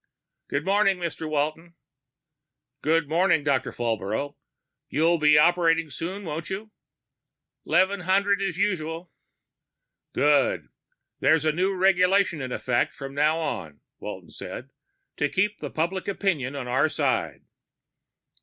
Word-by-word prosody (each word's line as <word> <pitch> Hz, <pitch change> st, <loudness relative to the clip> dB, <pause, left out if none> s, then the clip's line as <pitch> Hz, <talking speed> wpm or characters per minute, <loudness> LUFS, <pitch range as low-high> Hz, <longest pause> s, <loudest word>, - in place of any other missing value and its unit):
"Morning, 195 Hz, +6 st, +2 dB
Mr. 165 Hz, -2 st, -4 dB
Walton." 155 Hz, +3 st, -2 dB, 1.1 s
"Good 160 Hz, 0 st, +2 dB
morning, 165 Hz, 0 st, +2 dB
Doctor 140 Hz, -4 st, 0 dB
Falbrough. 115 Hz, +4 st, -2 dB, 0.5 s
You'll 165 Hz, +3 st, +2 dB
be 150 Hz, 0 st, +5 dB
operating 165 Hz, -1 st, +3 dB
soon, 185 Hz, +8 st, -5 dB
won't 160 Hz, -1 st, -5 dB
you?" 205 Hz, +3 st, -5 dB, 1.0 s
"Eleven 195 Hz, +2 st, +3 dB
hundred, 200 Hz, +3 st, +2 dB
as 190 Hz, -4 st, -2 dB
usual." 170 Hz, -4 st, -2 dB, 1.0 s
"Good. 145 Hz, -2 st, +2 dB, 0.5 s
There's 155 Hz, +3 st, +3 dB
a 155 Hz, -, +4 dB
new 185 Hz, +5 st, 0 dB
regulation 185 Hz, -2 st, +3 dB
in 130 Hz, -1 st, -5 dB
effect 125 Hz, -1 st, 0 dB
from 135 Hz, -1 st, -7 dB
now 150 Hz, +3 st, +2 dB
on," 95 Hz, -, -4 dB, 0.2 s
Walton -, -, -8 dB
said. -, -, -8 dB, 0.5 s
"To 145 Hz, -, +1 dB
keep 205 Hz, +5 st, 0 dB, 0.2 s
public 175 Hz, +4 st, -1 dB
opinion 170 Hz, -9 st, -1 dB
on 135 Hz, -3 st, -5 dB
our 130 Hz, +5 st, +2 dB
side." -, -, -1 dB
165 Hz, 115 wpm, -25 LUFS, 145-185 Hz, 1.1 s, be